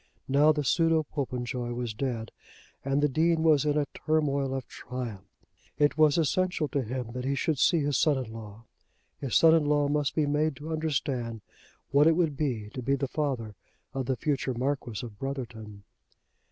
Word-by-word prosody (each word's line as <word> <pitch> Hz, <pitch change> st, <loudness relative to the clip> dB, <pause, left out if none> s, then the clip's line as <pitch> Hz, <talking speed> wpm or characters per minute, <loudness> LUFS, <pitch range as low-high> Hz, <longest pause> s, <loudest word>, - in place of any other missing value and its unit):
Now 145 Hz, +3 st, +5 dB
the 150 Hz, -1 st, -1 dB
pseudo 165 Hz, +3 st, +3 dB
Popenjoy 125 Hz, -4 st, -3 dB
was 120 Hz, -2 st, -3 dB
dead, 115 Hz, -1 st, -3 dB, 0.5 s
and 140 Hz, +2 st, +1 dB
the -, -, +5 dB
Dean 160 Hz, +3 st, +2 dB
was 155 Hz, -3 st, +4 dB
in 150 Hz, 0 st, +2 dB
a 150 Hz, -, +2 dB
turmoil 140 Hz, -3 st, 0 dB
of 135 Hz, -, -4 dB
triumph. 115 Hz, -6 st, -7 dB, 0.5 s
It 145 Hz, 0 st, +3 dB
was 155 Hz, -1 st, +4 dB
essential 170 Hz, 0 st, +1 dB
to 140 Hz, -, 0 dB
him 125 Hz, 0 st, -4 dB
that 125 Hz, +1 st, -5 dB
he 140 Hz, +2 st, 0 dB
should 145 Hz, +1 st, 0 dB
see 170 Hz, -, +4 dB
his 145 Hz, -1 st, +1 dB
son 150 Hz, -3 st, +3 dB
in 125 Hz, -4 st, -5 dB
law. 110 Hz, -1 st, -10 dB, 0.6 s
His 135 Hz, -4 st, -3 dB
son 160 Hz, -1 st, +7 dB
in 165 Hz, -2 st, +4 dB
law 145 Hz, -1 st, +3 dB
must 145 Hz, -1 st, 0 dB
be 155 Hz, -, +2 dB
made 150 Hz, +1 st, +1 dB
to 155 Hz, +4 st, -6 dB
understand 135 Hz, -7 st, -2 dB, 0.5 s
what 145 Hz, +3 st, +5 dB
it 165 Hz, -, +5 dB
would 160 Hz, -4 st, +1 dB
be 120 Hz, -8 st, -2 dB
to 130 Hz, -, -5 dB
be 135 Hz, +3 st, +1 dB
the 135 Hz, 0 st, -2 dB
father 130 Hz, -8 st, -2 dB, 0.4 s
of 135 Hz, -2 st, -3 dB
the 130 Hz, -, +1 dB
future 140 Hz, -4 st, -1 dB
Marquis 125 Hz, -4 st, -2 dB
of 105 Hz, -3 st, -11 dB
Brotherton. 115 Hz, -7 st, -6 dB
140 Hz, 185 wpm, -28 LUFS, 125-150 Hz, 0.6 s, son